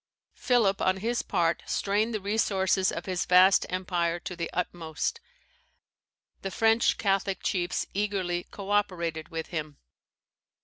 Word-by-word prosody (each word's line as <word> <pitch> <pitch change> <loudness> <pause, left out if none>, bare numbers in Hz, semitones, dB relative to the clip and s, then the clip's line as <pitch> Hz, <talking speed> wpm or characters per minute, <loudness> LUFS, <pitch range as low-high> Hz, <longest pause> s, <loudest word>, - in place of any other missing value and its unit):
Philip, 225 -7 +2
on 185 0 +2
his 235 +5 -1
part, 170 -1 0
strained 210 +3 0
the 215 - -2
resources 195 -2 +1
of 165 - -5
his 185 -2 -1
vast 185 +2 +5
empire 175 -2 -1
to 180 - -6
the 170 -1 -4
utmost. 170 - -3 1.2
The 195 - -3
French 225 +3 +3
Catholic 195 -1 0
chiefs 175 -2 -1
eagerly 190 -4 -1
co 200 0 -7
operated 170 -6 -1
with 165 -2 -5
him. 155 -3 -5
185 Hz, 130 wpm, -28 LUFS, 175-205 Hz, 1.2 s, vast